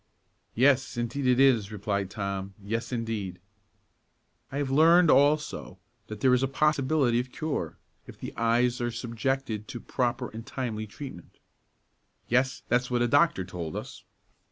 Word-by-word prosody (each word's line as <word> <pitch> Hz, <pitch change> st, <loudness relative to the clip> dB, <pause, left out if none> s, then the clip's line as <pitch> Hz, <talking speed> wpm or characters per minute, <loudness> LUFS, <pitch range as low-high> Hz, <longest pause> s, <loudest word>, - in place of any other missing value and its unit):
"Yes, 130 Hz, 0 st, +3 dB
indeed 120 Hz, +3 st, -2 dB
it 125 Hz, 0 st, +4 dB
is," 120 Hz, -7 st, +4 dB
replied 100 Hz, -2 st, -2 dB
Tom; 100 Hz, -1 st, -4 dB
"yes, 115 Hz, +5 st, -4 dB
indeed!" 110 Hz, -7 st, -3 dB, 1.1 s
"I 140 Hz, -, -4 dB
have 140 Hz, -2 st, -1 dB
learned, 165 Hz, +4 st, +6 dB
also, 145 Hz, -, +2 dB, 0.3 s
that 110 Hz, -1 st, -8 dB
there 130 Hz, -1 st, +5 dB
is 125 Hz, -, +3 dB
a 135 Hz, -, +2 dB
possibility 140 Hz, -3 st, +2 dB
of 125 Hz, +1 st, -4 dB
cure, 155 Hz, +2 st, -3 dB, 0.3 s
if -, -, -11 dB
the -, -, -8 dB
eyes 120 Hz, +2 st, +1 dB
are 120 Hz, -, 0 dB
subjected 115 Hz, -1 st, -3 dB
to 120 Hz, -, -6 dB
proper 125 Hz, -1 st, -2 dB
and 115 Hz, +1 st, -8 dB
timely 110 Hz, -4 st, -4 dB
treatment." 105 Hz, -, -10 dB, 0.9 s
"Yes, 130 Hz, +2 st, +1 dB
that's 125 Hz, +1 st, +1 dB
what 120 Hz, -1 st, +1 dB
a -, -, +2 dB
doctor 145 Hz, -, +3 dB
told 85 Hz, -4 st, -6 dB
us." -, -, -7 dB
120 Hz, 150 wpm, -28 LUFS, 110-135 Hz, 1.1 s, learned